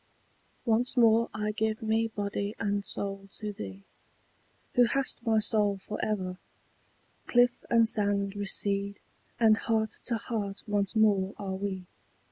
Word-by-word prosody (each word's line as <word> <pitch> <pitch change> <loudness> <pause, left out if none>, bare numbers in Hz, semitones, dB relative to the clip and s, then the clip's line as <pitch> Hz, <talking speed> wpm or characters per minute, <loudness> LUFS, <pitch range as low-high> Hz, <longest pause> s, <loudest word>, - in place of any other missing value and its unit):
Once 240 +2 +2
more 230 -1 +5
I 210 0 -2
give 220 +1 -1
me 220 +1 +1
body 205 -1 -3
and 205 -2 -1
soul 195 0 -3
to 210 -1 -5
thee, 100 - -8 0.9
Who 245 - +6
hast 265 0 0
my 225 -2 +2
soul 210 -2 +2
for 210 +2 -6
ever: 185 -3 -2 0.9
cliff 245 0 +3
and 230 -1 +5
sand 200 -2 +1
Recede, 200 0 0 0.4
and 220 -2 +5
heart 220 -2 0
to 235 - 0
heart 210 -3 -4
once 205 0 -1
more 205 -3 +3
are 195 -2 -4
we. 190 -1 -4
210 Hz, 135 wpm, -29 LUFS, 200-225 Hz, 0.9 s, Who